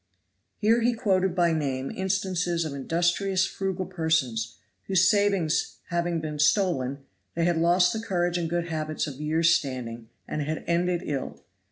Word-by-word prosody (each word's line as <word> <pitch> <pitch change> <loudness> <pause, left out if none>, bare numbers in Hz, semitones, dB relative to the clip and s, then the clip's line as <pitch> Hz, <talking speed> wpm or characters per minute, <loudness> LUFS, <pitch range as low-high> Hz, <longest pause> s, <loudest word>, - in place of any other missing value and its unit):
Here 225 +2 +3
he 240 +1 +3
quoted 190 -4 +1
by 170 -2 +3
name 135 -4 -2
instances 180 -3 -1
of 150 - -4
industrious, 175 +6 +1
frugal 190 -1 -3
persons, 160 -10 -1 0.3
whose 185 -1 +4
savings 200 -6 +2
having 170 -1 0
been 155 -1 -5
stolen, 145 -5 +1 0.3
they 165 0 +1
had 175 -1 +2
lost 175 +4 +3
courage 175 -4 0
and 170 -2 -1
good 170 0 -1
habits 155 -1 -2
of 145 -2 -7
years' 160 +2 +3
standing, 125 -7 -3 0.2
and 155 - -3
had 155 +2 -3
ended 175 +1 0
ill. 140 -3 -4
170 Hz, 150 wpm, -26 LUFS, 150-185 Hz, 0.3 s, whose